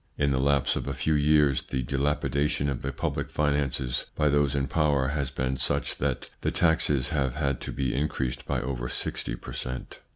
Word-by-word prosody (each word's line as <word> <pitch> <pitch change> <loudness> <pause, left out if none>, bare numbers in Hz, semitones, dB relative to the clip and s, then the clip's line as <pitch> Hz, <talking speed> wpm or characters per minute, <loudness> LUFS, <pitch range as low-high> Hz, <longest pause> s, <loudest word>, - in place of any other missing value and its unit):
In 70 -1 +2
the 65 - +1
lapse 70 0 +2
of - - -3
a - - -2
few 80 - +1
years, 75 -2 +4
the 65 -1 -3
dilapidation 70 +1 0
of 65 -3 -3
the 70 - -2
public 65 - -2
finances 70 -4 0
by 75 -1 +3
those 70 -1 +2
in 70 -1 +1
power 70 -3 +2
has 70 -2 -1
been 65 -1 -2
such - - -1
that 65 -2 -1
the - - +1
taxes 75 -4 +2
have 70 -6 0
had 70 -4 -1
to - - -4
be 65 -2 -1
increased 70 -3 -2
by - - 0
over 60 -2 -3
sixty - - -3
per - - -9
cent. 65 0 -5
70 Hz, 195 wpm, -27 LUFS, 65-75 Hz, -, years